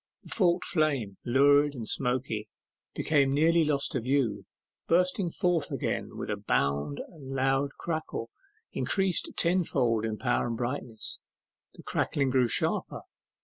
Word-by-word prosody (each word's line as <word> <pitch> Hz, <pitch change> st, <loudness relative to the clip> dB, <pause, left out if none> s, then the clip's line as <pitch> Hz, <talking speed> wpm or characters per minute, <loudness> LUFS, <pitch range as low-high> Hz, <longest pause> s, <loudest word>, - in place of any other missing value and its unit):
The -, -, -14 dB
forked 180 Hz, -4 st, +2 dB
flames, 140 Hz, -, 0 dB
lurid 145 Hz, +3 st, +4 dB
and 115 Hz, -4 st, -6 dB
smoky, 125 Hz, -4 st, -1 dB, 0.5 s
became 140 Hz, -3 st, +2 dB
nearly 165 Hz, +3 st, +4 dB
lost 145 Hz, -2 st, 0 dB
to 130 Hz, -, -1 dB
view, 120 Hz, -5 st, 0 dB, 0.4 s
bursting 180 Hz, +1 st, +2 dB
forth 170 Hz, -3 st, 0 dB
again -, -, -3 dB
with -, -, -4 dB
a -, -, -1 dB
bound 70 Hz, +1 st, 0 dB
and 145 Hz, -6 st, -12 dB
loud 135 Hz, +1 st, +1 dB
crackle, 155 Hz, -8 st, -4 dB, 0.4 s
increased 190 Hz, -3 st, +1 dB
tenfold 135 Hz, -11 st, +1 dB
in 110 Hz, -1 st, -2 dB
power 120 Hz, 0 st, 0 dB
and 115 Hz, -1 st, -3 dB
brightness. 120 Hz, -2 st, -4 dB, 0.6 s
The -, -, -13 dB
crackling 140 Hz, -2 st, 0 dB
grew 130 Hz, -2 st, +3 dB
sharper. -, -, -1 dB
135 Hz, 135 wpm, -29 LUFS, 120-160 Hz, 0.6 s, lurid